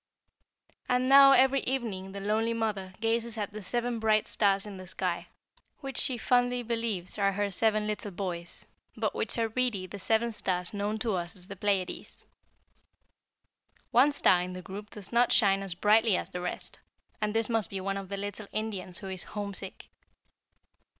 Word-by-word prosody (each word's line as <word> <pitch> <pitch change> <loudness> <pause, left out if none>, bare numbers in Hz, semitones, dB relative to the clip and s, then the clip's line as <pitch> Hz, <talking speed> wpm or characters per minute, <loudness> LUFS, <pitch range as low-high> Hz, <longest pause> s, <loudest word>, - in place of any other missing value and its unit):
"And 250 +1 +2
now 275 0 +9
every 265 +1 +5
evening 215 -9 -3
the 200 - -5
lonely 220 +3 0
mother 205 -4 -2
gazes 230 0 0
at 205 -1 -4
seven 240 +3 -2
bright 215 -1 +2
stars 200 -1 +2
in 205 -2 -8
the 185 0 -10
sky, 180 -2 -2 0.5
which 270 -2 -3
she 255 - +1
fondly 245 +1 +2
believes 225 -6 -2
are 195 -1 +2
her 205 +1 -1
seven 215 +2 +2
little 210 0 -3
boys, 175 -2 -5 0.3
but - - -1
which - - -1
are 225 -1 +1
really 225 -5 0
the 200 +2 -9
seven 225 +3 +1
stars 180 -4 -1
known 205 +1 -1
to 220 -1 -1
us 175 -1 -2
as 185 0 -8
the 200 - -6
Pleiades. 195 -2 -2 1.7
One 265 +5 +5
star 185 -10 +4
in 180 +1 -4
the 185 0 -7
group 205 +4 -8
does 205 -3 -6
not 240 +1 +4
shine 195 -3 +5
as 195 -3 -4
brightly 210 +1 +4
as - - -4
the 180 - -4
rest, 180 - -4 0.4
and 210 0 -1
this 225 -1 +2
must 225 -3 +2
be 195 - -4
one 195 +1 -2
of 195 -1 -7
the 200 - -3
little 205 +1 -5
Indians 205 -5 -3
who 195 - -7
is 190 -1 -4
homesick." 200 -2 -7
210 Hz, 175 wpm, -29 LUFS, 190-230 Hz, 1.7 s, now